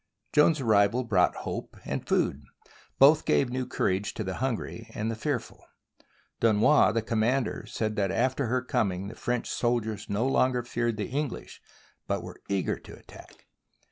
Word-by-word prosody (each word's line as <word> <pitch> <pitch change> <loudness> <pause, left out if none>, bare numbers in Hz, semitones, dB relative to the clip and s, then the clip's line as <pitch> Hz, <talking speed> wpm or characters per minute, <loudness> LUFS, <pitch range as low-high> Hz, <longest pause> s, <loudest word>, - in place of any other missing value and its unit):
Joan's 150 +1 +5
arrival 110 0 +3
brought 100 -7 +2
hope - - -5
and - - -4
food. 70 - +1 0.6
Both 150 +3 +6
gave 130 -3 +2
new 130 0 -2
courage 100 +3 -1
to 110 - -3
the 95 -1 -3
hungry 115 -3 -3
and 110 +2 -2
the - - -3
fearful. 125 +1 -4 0.8
Du 115 - +4
nois, 110 +4 +5
the 115 0 -1
commander, 115 +4 0
said 110 -1 -2
that 100 -2 +1
after 130 +3 0
her 125 +2 0
coming 100 -7 -1
the 115 - -10
French 120 -1 -2
soldiers 115 -3 -1
no 105 +4 0
longer 130 -2 +2
feared 120 -2 -2
the 105 -3 -3
English, 140 +1 -4 0.5
but - - -1
were - - -10
eager 100 -1 -1
to - - -12
attack. - - -16
115 Hz, 165 wpm, -28 LUFS, 105-130 Hz, 0.8 s, Both